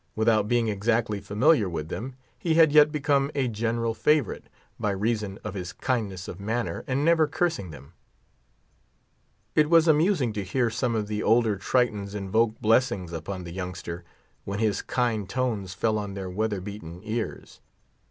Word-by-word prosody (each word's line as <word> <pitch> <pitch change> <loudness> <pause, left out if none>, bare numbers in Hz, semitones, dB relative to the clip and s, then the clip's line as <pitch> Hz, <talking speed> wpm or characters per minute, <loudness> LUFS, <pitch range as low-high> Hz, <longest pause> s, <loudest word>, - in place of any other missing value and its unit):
Without 110 -1 +2
being 120 0 +2
exactly 110 +1 0
familiar 105 - +3
with 80 -2 -4
them, 130 +3 -5 0.2
he 165 -2 0
had 160 -2 +6
yet 150 0 +6
become 140 -2 +1
a 135 -3 +1
general 115 +1 -1
favourite, 150 -1 +1 0.3
by 105 - 0
reason 105 0 -1
of 105 - -5
his 90 -3 -5
kindness 100 -8 -2
of 90 - -7
manner, 115 +4 -2
and 135 +3 0
never 165 -2 +4
cursing 160 - -1
them. 75 +1 -12 1.6
It 150 -1 +3
was 165 -1 +5
amusing 155 - +3
to 105 -1 -3
hear 115 +5 0
some 120 +1 -1
of 105 -2 -1
the 105 0 -2
older 115 -1 +3
Tritons 105 -2 0
invoke 110 +3 0
blessings 110 -6 +1
upon 90 +3 -5
the 85 -1 -8
youngster, 90 -2 -6 0.4
when 100 0 -4
his 110 -1 0
kind 115 -6 -1
tones 110 -8 -2
fell 110 0 +1
on 100 -2 -5
their 95 -2 -5
weather 105 0 -1
beaten 90 -3 -8
ears. 110 +1 -5
110 Hz, 160 wpm, -26 LUFS, 100-125 Hz, 1.6 s, had